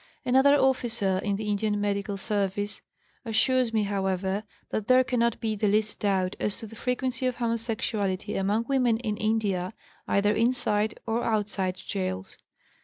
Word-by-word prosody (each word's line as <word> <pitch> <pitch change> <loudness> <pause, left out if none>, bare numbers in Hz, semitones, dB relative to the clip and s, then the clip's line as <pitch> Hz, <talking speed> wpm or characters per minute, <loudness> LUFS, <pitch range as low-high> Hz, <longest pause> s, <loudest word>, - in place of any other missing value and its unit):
Another 265 +3 +5
officer 240 -8 +1
in 205 -1 0
the 210 +1 -4
Indian 210 0 0
Medical 200 0 -1
Service 205 0 -2 0.4
assures 245 +1 +2
me, 220 -2 +2
however, 195 0 -1 0.3
that 215 -1 -2
there 255 0 +6
cannot 235 -2 +1
be 220 -1 -1
the 210 0 +1
least 210 +1 +1
doubt 190 -2 +1
as 205 - -1
to - - -7
the 225 +1 -11
frequency 255 +2 -1
of 250 - -1
homosexuality 225 -4 -1
among 205 +4 +1
women 250 -4 +3
in 220 -3 -2
India, 210 -4 0 0.3
either 205 +1 +3
inside 220 -2 +1
or 230 +1 0
outside 200 -4 -1 0.2
gaols. 95 0 -3
215 Hz, 150 wpm, -27 LUFS, 200-235 Hz, 0.4 s, there